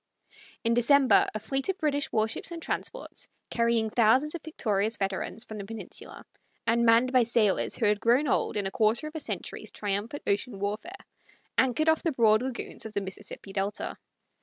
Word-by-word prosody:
In 230 -1 +2
December 260 +3 +5
a - - -1
fleet 270 - -2
of 385 - 0
British 295 -2 -1
war 215 0 +2
ships 225 - -3
and 340 -1 -6
transports, - - -4 0.2
carrying 230 -2 +1
thousands 250 +7 +3
of 340 - -5
victorious 220 -8 -1
veterans 195 +3 -3
from 215 -3 -8
the - - -5
Peninsula, 220 +2 -7 0.4
and 235 +1 +2
manned 235 +3 +4
by 255 - +6
sailors 225 -4 +2
who 230 - 0
had 210 0 +3
grown 250 +6 +3
old 225 - 0
in 200 - -1
a 195 - -2
quarter 225 +4 +2
of 305 - -6
a 320 - -4
century's - - -4
triumphant 205 +7 -3
ocean 205 +2 -1
warfare, 210 - -5 0.5
anchored 260 +5 +2
off 320 -1 +4
the 330 - 0
broad 220 -3 +4
lagoons 255 -1 -2
of 215 - -12
the 200 - -1
Mississippi 195 0 -7
delta. 200 +1 -2
230 Hz, 185 wpm, -28 LUFS, 210-275 Hz, 0.5 s, by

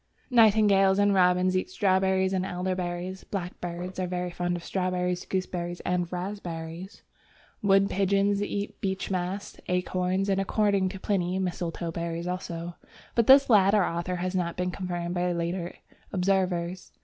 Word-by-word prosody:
Nightingales 205 -4 +5
and 205 0 +4
robins 180 0 +3
eat 185 - 0
strawberries 190 - +2
and 185 -1 0
elderberries; 180 0 -3
blackbirds 180 -1 -5
are 185 - -1
very 180 0 -3
fond 175 0 -2
of 170 - -9
strawberries, 180 -1 -1
gooseberries, 175 -2 -3
and 180 -1 -1
raspberries. 180 -1 -6 0.6
Wood 195 -1 +4
pigeons 200 +1 +1
eat 205 0 -4
beechmast, 190 0 -3
acorns, 180 +1 0
and, 195 -1 +1
according 200 -1 +1
to 190 0 -8
Pliny, 185 -2 0
mistletoe 175 -2 -3
berries 170 0 -4
also, 175 -1 -5 0.4
but 235 -2 +2
this 275 +1 +8
latter 200 -3 +5
author 170 +2 -2
has 180 +1 -2
not 175 -2 -1
been 180 0 -1
confirmed 175 -2 -3
by 180 0 0
later 170 +1 -3 0.4
observers. 185 -2 0
185 Hz, 135 wpm, -27 LUFS, 175-195 Hz, 0.6 s, this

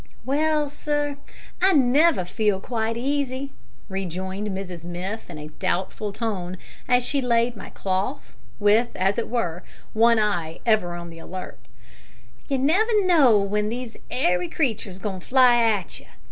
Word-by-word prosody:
"Well, 300 +2 +1
sir, 290 0 -2 0.4
I 380 +1 +5
never 280 - +4
feel 210 +1 0
quite 225 +1 -2
easy," 275 +1 -2 0.4
rejoined 190 +1 -4
Mrs 190 -4 -5
Miff 180 +5 -5
in 170 - -7
a 150 0 -8
doubtful 190 +6 -2
tone, 190 -4 -3 0.3
as 245 0 +3
she 275 +2 0
laid 235 -1 +2
my 200 - -9
cloth, 195 - -3 0.2
with, 215 +4 +4
as 195 +4 +1
it 235 - -3
were, 180 -8 -1 0.3
one 230 +1 +5
eye 175 -7 0
ever 210 -7 +2
on 170 -1 -7
the 165 - -11
alert: 185 +2 -8 0.9
"you 275 - 0
never 405 - +3
knows 270 - +5
w'en 210 +1 0
these 240 0 -5
'airy 180 -8 +1
creatures 220 - -1
is - - -12
goin' 195 -3 -3
to - - -17
fly 250 -2 +6
at 210 -6 0
you. - - -19
220 Hz, 155 wpm, -24 LUFS, 185-260 Hz, 0.9 s, fly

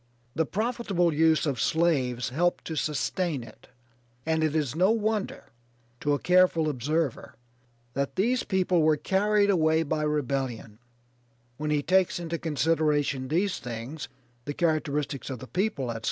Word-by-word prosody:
The 160 -2 0
profitable 205 - 0
use 160 +1 +3
of 135 -6 -1
slaves 130 -5 +1
helped 175 +7 0
to 160 - -4
sustain 155 -1 -1
it, 110 -2 -15 0.6
and 160 0 +1
it 155 -1 0
is 150 -3 0
no 185 +4 +3
wonder, 220 -2 -1 0.5
to 145 - +1
a - - -1
careful 180 -2 +3
observer, 145 +1 -2 0.6
that 140 +1 -2
these 235 +6 +1
people 185 -3 +1
were 155 -1 +3
carried 205 +5 +2
away 160 -3 +3
by 155 0 -2
rebellion, 135 -7 -2 0.8
when 150 0 -3
he 150 -1 +1
takes 185 +2 +2
into 170 -1 -4
consideration 150 -3 0
these 180 +7 0
things, 120 +5 -6 0.4
the 145 - -4
characteristics 150 -4 -1
of 130 - -4
the 120 - -9
people, 145 - -1
etc. 115 - -5
155 Hz, 145 wpm, -27 LUFS, 140-180 Hz, 0.8 s, use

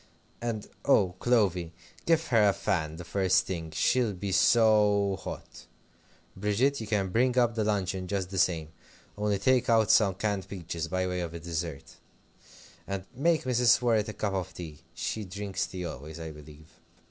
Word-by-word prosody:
And, 115 -3 -3 0.2
oh, 100 -10 +3
Clovy! 95 -8 +1 0.3
give 165 -1 +3
her 110 -4 +5
a - - +2
fan 80 -8 -1
the 85 - -8
first 95 +1 +2
thing. 85 -4 -4
She'll 115 +7 +1
be 100 +1 -4
so 105 -1 +4
hot. - - -8 0.7
Bridget, 110 +8 +1
you 110 - -6
can 100 -3 0
bring 125 +5 +1
up 120 -2 +3
the 110 -1 -1
luncheon 95 -3 -1
just 95 -1 -3
the 95 - -2
same, 85 -5 +1 0.5
only 105 -1 0
take 125 +5 +2
out 110 -2 +4
some 100 -4 +4
canned 100 -1 -2
peaches, 85 -3 -5
by 95 +2 -1
way 90 0 -2
of 85 -1 -4
a - - -5
dessert, 80 -3 -5 0.9
and 95 -1 -4
make 160 +5 +2
Mrs. 125 -2 +4
Worrett 115 -3 +1
a - - -5
cup 105 -2 -2
of 95 -1 -3
tea. 80 -4 -8 0.2
She 110 - -3
drinks 100 +1 -4
tea 90 -1 -6
always, 80 +1 -7
I 80 -1 -6
believe. 75 +1 -14
100 Hz, 170 wpm, -28 LUFS, 90-110 Hz, 0.9 s, her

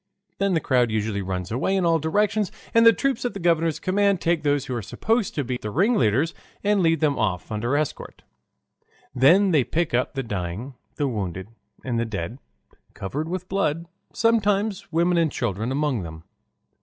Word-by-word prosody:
Then 195 -2 +2
the - - +3
crowd 125 -5 +2
usually 110 -2 -1
runs 95 -1 -4
away 135 - 0
in 190 -2 +1
all 165 -1 +3
directions, 205 +6 +1 0.2
and 230 0 +6
the - - +10
troops 275 +3 -1
at 245 - -2
the - - -4
governor's 165 -2 +1
command 200 0 +2
take 170 -1 +1
those 145 -2 +1
who 130 - -4
are 120 - -2
supposed 225 - -1
to 145 - 0
be 125 0 -3
the 105 - -4
ringleaders 155 - +2 0.3
and 205 -1 +2
lead 165 -3 +2
them 145 -3 +1
off 95 -3 -1
under 120 +6 0
escort. 150 -1 -4 0.9
Then 180 +10 +5
they 150 -6 +4
pick 165 +4 -1
up 125 +3 0
the 135 - -2
dying, 105 +4 -4 0.2
the 145 - 0
wounded, 95 -5 -4 0.4
and 120 -3 -1
the 115 - 0
dead, 110 +2 -5 0.6
covered 145 +12 -4
with 185 0 -4
blood, 170 -4 -1 0.3
sometimes 205 -3 +1
women 170 +1 +2
and 160 -3 +2
children 110 0 -2
among 140 -4 0
them. 80 -1 -8
150 Hz, 180 wpm, -24 LUFS, 115-185 Hz, 0.9 s, the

